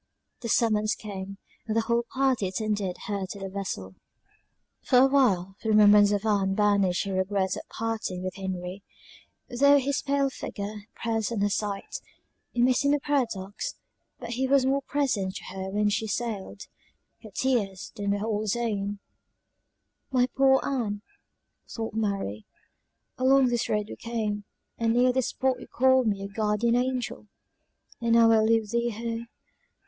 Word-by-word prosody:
The 235 - -5
summons 215 -2 +2
came, 195 -2 -7 0.3
and 220 0 0
the - - +4
whole 235 +1 0
party 260 -6 +1
attended 205 -1 -2
her 200 -2 -3
to 200 - -8
the 195 0 -5
vessel. 185 - -5 0.9
For 250 - +3
a 255 - +8
while 200 -10 +2
the 220 - -2
remembrance 210 -1 +7
of 205 +1 0
Ann 195 -3 +1
banished 200 -3 +2
her 195 - -3
regret 190 0 0
at - - -9
parting 220 -5 -3
with 185 -1 -3
Henry, 185 0 -5 0.7
though 280 +4 +5
his 280 +1 0
pale 280 -1 +1
figure 210 -3 -6
pressed 225 -1 -1
on 220 -4 -1
her 205 0 +2
sight; 200 -1 -3 0.5
it 240 - +2
may 255 +1 +5
seem 285 +3 +2
a - - -1
paradox, 225 -9 -2 0.4
but 235 -1 -7
he 260 +2 0
was 270 -1 +4
more 275 +1 +2
present 255 -10 -1
to - - -7
her 190 0 -5
when 205 +1 +1
she 220 +2 -1
sailed; 210 -2 -4 0.6
her 220 - -11
tears 205 -4 -1
then 205 -2 -3
were 200 +1 0
all 215 -2 -1
his 215 -1 0
own. 205 -4 -2 1.1
"My 250 -2 +4
poor 270 0 +5
Ann!" 215 -7 -2 0.7
thought 225 -2 -5
Mary, 200 - -2 0.7
"along 260 0 +5
this 240 -1 -1
road 210 -1 +1
we - - -8
came, 215 -3 -3 0.3
and 230 0 +2
near 250 +1 +4
this 260 -1 +1
spot 260 -1 0
you - - -10
called 260 -1 +3
me 200 -2 0
your 195 - -4
guardian 215 +3 +1
angel 250 -4 -2 0.7
and 230 0 +2
now 230 -1 +6
I 225 - +5
leave 220 -1 +2
thee 235 0 +1
here! 230 +1 -4
220 Hz, 165 wpm, -27 LUFS, 200-245 Hz, 1.1 s, a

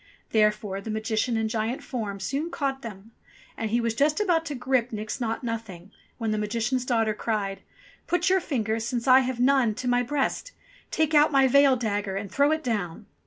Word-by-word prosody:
Therefore 210 -2 +1
the 220 - -8
Magician 220 +2 -1
in 220 0 0
giant 225 +3 -2
form 210 -6 -4
soon 280 - -2
caught 275 -4 -2
them 215 -2 -9
up, - - -41 0.3
and 225 - -3
he 235 +3 +1
was 230 -1 0
just 295 +5 +2
about 345 -6 +2
to 295 - -4
grip 250 -1 0
Nix 215 +3 -5
Naught 225 +1 -2
Nothing 215 -6 -6 0.3
when 225 -3 -2
the 215 - 0
Magician's 230 +4 -1
daughter 225 -3 +2
cried: 205 -3 -2 0.5
"Put 355 +1 +1
your 380 0 +4
fingers, 225 - -2
since 235 +1 -3
I 260 0 +8
have 255 -2 -2
none, 250 -4 +3
to 250 +2 -5
my 245 0 +3
breast. 290 - -2 0.4
Take 315 -1 0
out 300 +1 +5
my 270 -2 +5
veil 280 0 +5
dagger 205 -5 -2
and 200 0 -5
throw 285 +2 +3
it 315 0 0
down." 210 - -3
235 Hz, 200 wpm, -26 LUFS, 215-270 Hz, 0.5 s, I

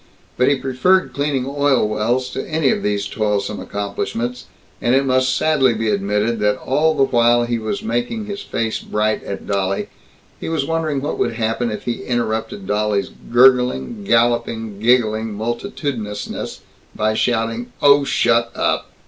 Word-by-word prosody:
But 125 - +2
he 140 - +4
preferred 135 +9 +1
cleaning 140 -3 -1
oil 140 -4 +2
wells 115 +4 -1
to - - -4
any 155 -3 +2
of - - -1
these 100 -1 -1
toilsome 105 -1 -1
accomplishments, 105 +4 -4 0.3
and 120 +2 +3
it 135 +1 +3
must 130 -1 +2
sadly 140 -6 +3
be 110 0 -1
admitted 105 +3 0
that 105 0 +2
all 155 +4 +1
the 140 - +3
while 120 -2 +3
he 120 0 -1
was 115 - -3
making 230 -1 -2
his 205 -1 -5
face 115 -1 -2
bright 105 0 -1
at 100 - -6
Dolly, 100 -1 -1 0.5
he - - -5
was 160 -4 0
wondering 160 -3 -1
what 145 - -3
would - - +1
happen 115 +1 -1
if 105 - -5
he 120 -1 -3
interrupted 110 -4 -2
Dolly's 105 -1 0 0.2
gurgling, 125 - +3
galloping, 115 - +1
giggling 110 -2 +2
multitudinousness 120 - -4 0.3
by 110 0 +1
shouting, 115 +1 -1
"Oh, 140 0 +6
shut 115 -3 +2
up!" - - 0
120 Hz, 155 wpm, -19 LUFS, 110-135 Hz, 0.5 s, Oh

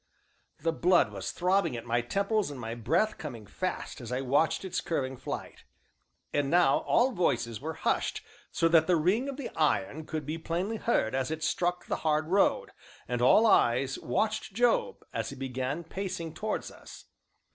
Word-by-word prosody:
The 165 - +1
blood 175 +2 +3
was - - -4
throbbing 180 -7 +1
at 115 - -7
my 120 0 +1
temples 200 - 0
and 140 -3 -7
my 115 -1 -4
breath 165 - 0
coming 120 -8 -7
fast 180 - -4
as 120 0 -7
I 125 - 0
watched 145 +8 +1
its 185 - -2
curving 135 -5 -2
flight. - - -7 0.7
And 145 -1 +1
now 170 -4 +4
all 255 +3 +4
voices 120 - 0
were 160 +2 -4
hushed - - -1 0.3
so 165 - +2
that 160 -1 +5
the 180 - +4
ring 195 - +1
of 275 - -6
the 280 - -5
iron 150 -1 0
could 155 -2 -4
be 155 +3 -4
plainly 180 +7 -2
heard 215 - +1
as 130 +1 0
it 160 0 -4
struck 175 +2 0
the - - -2
hard 155 0 0
road, 195 +2 +2 0.4
and 120 0 -2
all 210 - +6
eyes 130 - +3
watched 215 - -1
Job, 470 - +1
as - - -2
he - - -7
began 130 +4 -3
pacing 175 -2 -5
towards 215 +4 -3
us. - - -13
160 Hz, 180 wpm, -29 LUFS, 130-190 Hz, 0.7 s, all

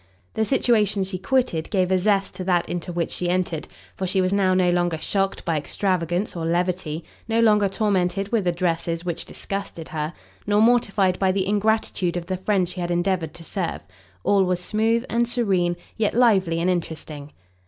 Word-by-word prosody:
The 220 - +1
situation 215 -6 +2
she 190 -1 -4
quitted 245 -11 0
gave 185 -2 +1
a 185 - +3
zest 195 0 +1
to 185 0 -5
that 175 -2 +2
into 175 0 -4
which 170 -1 -2
she 175 - -2
entered, 175 -3 -1 0.3
for 190 - -3
she 190 +2 +1
was 185 +1 +1
now 190 -2 +3
no 180 -1 +3
longer 175 -2 +1
shocked 195 +4 -1
by 165 -3 +1
extravagance 180 +4 -1
or 170 - -3
levity, 170 -1 -1 0.2
no 225 0 +1
longer 210 -3 +4
tormented 195 -1 0
with 215 -6 +1
addresses 170 -1 -1
which 175 -2 -3
disgusted 195 -5 -6
her, 155 +1 -3 0.3
nor 205 0 +3
mortified 210 -5 +3
by 190 -1 +3
the 190 0 0
ingratitude 205 -4 +1
of 170 - -4
the 185 +1 -2
friend 190 -1 +1
she 180 +1 -6
had 175 - -2
endeavoured 175 -2 0
to 170 - -11
serve. 180 0 -3 0.4
All 200 -1 +4
was 180 -1 0
smooth 225 +5 +1
and 235 +1 0
serene, 190 -8 +1 0.2
yet 220 -1 0
lively 195 -9 +3
and 170 - 0
interesting. 155 -4 -3
185 Hz, 185 wpm, -23 LUFS, 175-205 Hz, 0.4 s, longer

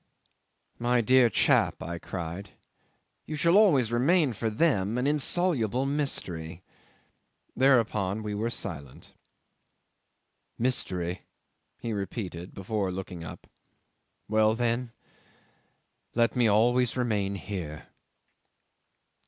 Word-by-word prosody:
'"My 120 0 +2
dear 125 +1 +5
chap," - - +2
I 85 0 -5
cried, 90 +3 -6 0.8
"you 155 - -4
shall 170 +4 +3
always 145 - +5
remain 140 +3 +3
for 110 +2 -2
them 110 - +1
an 125 - 0
insoluble 145 - +1
mystery." 95 - -3 0.9
Thereupon 110 -6 +2
we 105 -1 -3
were 110 +3 -1
silent. 75 - -6 1.4
'"Mystery," 90 -8 -2 0.5
he 115 - -4
repeated, 95 -3 -5
before 100 0 -2
looking 90 -2 -6
up. 80 - -9 0.8
"Well, 110 0 +3
then 120 0 -1 1.2
let 115 0 +2
me 120 -2 +3
always 120 +4 +3
remain 105 -5 0
here." 90 -6 -6
110 Hz, 95 wpm, -28 LUFS, 95-125 Hz, 1.4 s, dear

